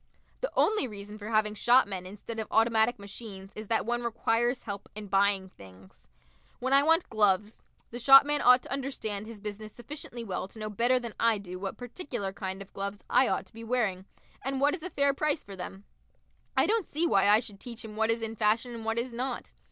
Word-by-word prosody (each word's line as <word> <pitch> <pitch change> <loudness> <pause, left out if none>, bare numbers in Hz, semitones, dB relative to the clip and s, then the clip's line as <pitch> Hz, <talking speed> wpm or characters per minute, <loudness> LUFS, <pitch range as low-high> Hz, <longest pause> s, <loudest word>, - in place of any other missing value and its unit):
The - - -2
only 425 -11 +3
reason 210 -1 -9
for 210 +1 -7
having 215 -1 +2
shopmen 205 -5 +3
instead 210 +4 -7
of 220 - -3
automatic 225 +1 +3
machines 200 -1 -9
is 215 0 -7
that 225 0 +1
one 240 +1 0
requires 235 +1 0
help 200 -3 -6
in 215 0 -6
buying 195 -1 +2
things. 95 - -17 0.5
When 260 +2 -1
I 275 - +8
want 325 +4 +3
gloves, 210 0 +1 0.3
the 240 - -6
shopman 280 +3 +7
ought 250 0 +6
to - - -5
understand 220 -7 -3
his 225 -2 -9
business 215 +1 -7
sufficiently 240 0 -8
well 190 -3 -4
to 210 - -16
know 215 0 -4
better 240 +5 +3
than 235 -3 -5
I 230 -2 +3
do 185 -2 -8
what 195 0 -5
particular 245 - -5
kind 190 -1 -5
of 195 - -23
gloves 200 +1 -5
I 265 - +5
ought - - -1
to - - -22
be 225 +1 -9
wearing, 215 -6 -1 0.4
and 270 0 -2
what 285 +2 +3
is 355 - -4
a 365 - -5
fair 280 -4 +2
price 300 +2 -1
for 200 - -9
them. 190 +2 -8 0.7
I - - +5
don't 445 -3 +1
see 320 +4 0
why 200 - +4
I 210 +1 +7
should 205 -4 -8
teach 235 0 -7
him 215 -1 -9
what 220 +1 +1
is 230 0 0
in 225 0 -4
fashion 225 +3 +1
and 230 -1 -7
what 225 +1 -1
is 235 +1 -2
not. 250 +1 -4
225 Hz, 215 wpm, -29 LUFS, 200-250 Hz, 0.7 s, I